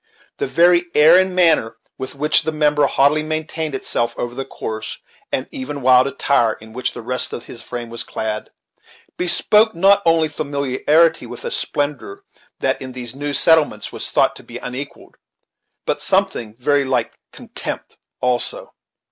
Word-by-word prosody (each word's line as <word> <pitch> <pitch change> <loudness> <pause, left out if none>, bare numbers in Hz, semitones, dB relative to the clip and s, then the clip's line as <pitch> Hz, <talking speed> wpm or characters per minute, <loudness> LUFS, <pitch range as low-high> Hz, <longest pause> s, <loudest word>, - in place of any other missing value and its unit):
The 420 - -2
very 175 - +4
air 155 +3 +7
and 185 0 +3
manner 160 -11 +3 0.2
with 130 +1 -6
which 150 +2 +2
the 160 - -2
member 150 -2 +2
haughtily 145 +3 +3
maintained 155 -1 -3
itself 120 -2 -2
over 120 0 -3
the 135 +2 -5
coarse 110 -4 -6 0.3
and - - -2
even 140 +1 -6
wild 130 0 +6
attire 130 -5 +1
in 110 +1 -14
which 125 +1 -2
the - - -8
rest 125 +2 -3
of 120 - -5
his 115 - -11
frame 120 -2 -7
was 115 - -3
clad, 110 -1 -4 0.7
bespoke 210 +4 +3
not 195 +3 +5
only 165 -1 +3
familiarity 145 +2 +1
with - - -9
a 475 - -3
splendor 150 - -2 0.4
that - - 0
in 130 -1 -7
those 125 -2 -7
new 145 +2 -4
settlements 150 -7 +2
was - - -5
thought - - +2
to - - -13
be - - -9
unequalled, 130 +3 -8 0.7
but - - -1
something 110 -2 0
very 140 +3 +2
like 130 -1 -1
contempt - - -7 0.3
also. 125 -1 -1
145 Hz, 160 wpm, -19 LUFS, 125-160 Hz, 0.7 s, air